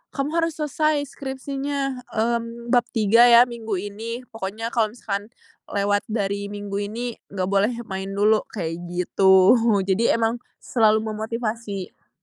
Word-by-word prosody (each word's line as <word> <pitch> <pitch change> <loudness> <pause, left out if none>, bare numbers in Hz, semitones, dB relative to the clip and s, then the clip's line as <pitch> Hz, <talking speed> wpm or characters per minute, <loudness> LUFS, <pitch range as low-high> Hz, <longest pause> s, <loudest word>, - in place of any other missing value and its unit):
kamu 280 +2 -1
harus 330 -2 -1
selesai 305 0 0
skripsinya, 275 0 -4
mmm, 235 +1 -2
bab 240 -1 +4
3 230 +3 +6
ya 235 +1 +8
minggu 225 -5 -4
ini 225 +5 -5
pokoknya 225 +2 -5
kalau 220 -3 +2
misalkan, 205 -3 -4 0.4
lewat 205 0 +1
dari 200 -2 -2
minggu 205 -1 -5
ini 230 +4 -4 0.2
gak 190 -2 -2
boleh 200 +4 +2
main 190 -2 -5
dulu 210 +1 +4
kayak 165 -4 -4
gitu. 190 +2 +5 0.3
Jadi, 195 +4 +2
emang 230 +1 0 0.2
selalu 220 -2 +2
memotivasi. 220 -3 -5
225 Hz, 135 wpm, -23 LUFS, 200-240 Hz, 0.4 s, ya